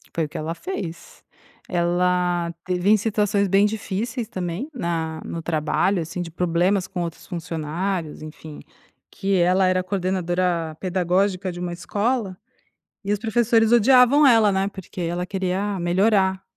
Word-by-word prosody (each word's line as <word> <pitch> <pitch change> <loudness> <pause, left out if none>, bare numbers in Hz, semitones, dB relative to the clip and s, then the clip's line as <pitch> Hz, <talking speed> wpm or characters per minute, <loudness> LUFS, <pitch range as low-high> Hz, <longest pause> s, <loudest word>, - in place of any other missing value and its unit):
Foi 165 - +1
o - - -9
que - - -7
ela 155 +2 -3
fez. 175 - -7 0.4
Ela 175 0 +1
teve 180 +1 0
em 215 - +6
situações 205 -1 +1
bem 195 +2 +4
difíceis 220 +2 -3
também 185 - -4
na 165 - -3
no 165 - -5
trabalho, 165 +4 0
assim, 165 +2 -5
de 175 - -5
problemas 180 +3 +1
com 185 -2 -4
outros 170 -1 -6
funcionários, 165 0 -4
enfim, 155 0 -10 0.5
que 195 0 -1
ela 180 +2 +3
era 185 0 +1
coordenadora 180 -3 -1
pedagógica 185 +1 0
de 175 - -8
uma 175 -1 -3
escola, 205 +2 -2 0.7
e 200 - 0
os 205 - 0
professores 225 0 +2
odiavam 250 +5 +6
ela, 225 -5 +5
né, 190 +1 +1
porque 190 -2 -9
ela 175 +1 -2
queria 190 +1 -2
melhorar 190 +2 +2
185 Hz, 145 wpm, -23 LUFS, 170-205 Hz, 0.7 s, em